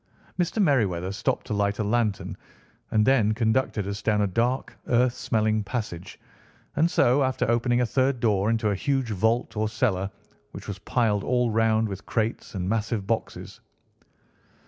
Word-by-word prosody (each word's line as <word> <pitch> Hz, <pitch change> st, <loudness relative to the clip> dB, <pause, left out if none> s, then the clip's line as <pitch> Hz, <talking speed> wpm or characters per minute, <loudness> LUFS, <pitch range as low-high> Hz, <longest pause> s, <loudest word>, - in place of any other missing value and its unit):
Mr. 175 Hz, +5 st, 0 dB
Merryweather 100 Hz, -, +2 dB
stopped 100 Hz, -, -2 dB
to -, -, -3 dB
light 100 Hz, 0 st, 0 dB
a 110 Hz, -, -1 dB
lantern, 110 Hz, -1 st, -1 dB, 0.5 s
and 105 Hz, -1 st, +2 dB
then 110 Hz, -5 st, +3 dB
conducted 110 Hz, -2 st, 0 dB
us 100 Hz, +1 st, -4 dB
down 105 Hz, -1 st, +1 dB
a -, -, +3 dB
dark, 120 Hz, +6 st, -1 dB
earth 125 Hz, 0 st, +3 dB
smelling 110 Hz, -3 st, 0 dB
passage, 100 Hz, -6 st, -5 dB, 0.6 s
and 160 Hz, +3 st, +3 dB
so, 130 Hz, -3 st, +3 dB
after 130 Hz, -2 st, 0 dB
opening 120 Hz, +1 st, +2 dB
a -, -, +2 dB
third 130 Hz, +1 st, +1 dB
door, 105 Hz, -3 st, +2 dB
into 110 Hz, -2 st, +1 dB
a -, -, 0 dB
huge 135 Hz, +2 st, -1 dB
vault 110 Hz, +5 st, 0 dB
or 110 Hz, 0 st, 0 dB
cellar, 105 Hz, -4 st, 0 dB, 0.4 s
which -, -, -9 dB
was 100 Hz, -2 st, -5 dB
piled 105 Hz, -1 st, 0 dB
all 125 Hz, -2 st, +1 dB
round 110 Hz, 0 st, +2 dB
with 100 Hz, -1 st, -7 dB
crates 110 Hz, -1 st, -2 dB
and 90 Hz, -1 st, -2 dB
massive 110 Hz, -1 st, -1 dB
boxes. 115 Hz, +2 st, -4 dB
110 Hz, 165 wpm, -25 LUFS, 105-125 Hz, 0.6 s, then